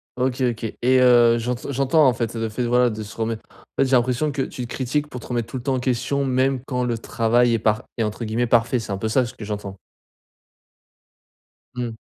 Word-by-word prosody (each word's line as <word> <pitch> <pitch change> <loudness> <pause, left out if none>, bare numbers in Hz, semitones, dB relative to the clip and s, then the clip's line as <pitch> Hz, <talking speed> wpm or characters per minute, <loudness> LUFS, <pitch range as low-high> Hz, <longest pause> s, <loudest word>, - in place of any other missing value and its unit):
OK 130 +1 -1
OK 115 -3 -1
et 130 +1 +4
heu, 120 -2 +6
j'ente 120 +1 -3
j'entends 140 +3 +3
en 130 - +4
fait 115 -1 -3
le 115 -1 -2
fait 125 +4 -3
de - - -1
voilà 125 +1 +3
de 110 -1 -5
se 110 +1 -11
remettre 115 -1 -3
en - - -22 0.3
fait 135 - 0
j'ai 130 - +3
l'impression 125 +4 +1
que 140 - -2
tu 125 - -4
te - - -9
critiques 140 +3 -1
pour 125 - -7
te - - -11
remettre 120 -2 -2
tout 130 - -6
le 125 - -7
temps 135 +1 0
en - - -1
question, 130 +2 -1
même 130 0 +1
quand 125 -2 -2
le 120 -2 -1
travail 115 +1 +2
est 115 - +1
par 110 0 +1
est 115 - +1
entre 110 +2 -3
guillemets 115 +3 0
«parfait». 120 +2 +3
C'est 110 - -6
un 100 - -1
peu 110 +3 -2
ça 125 +3 +2
ce - - -11
que 110 - -8
j'entends? 100 -2 -5 2.0
Mmh. 120 -2 -4
120 Hz, 245 wpm, -22 LUFS, 115-130 Hz, 2.0 s, heu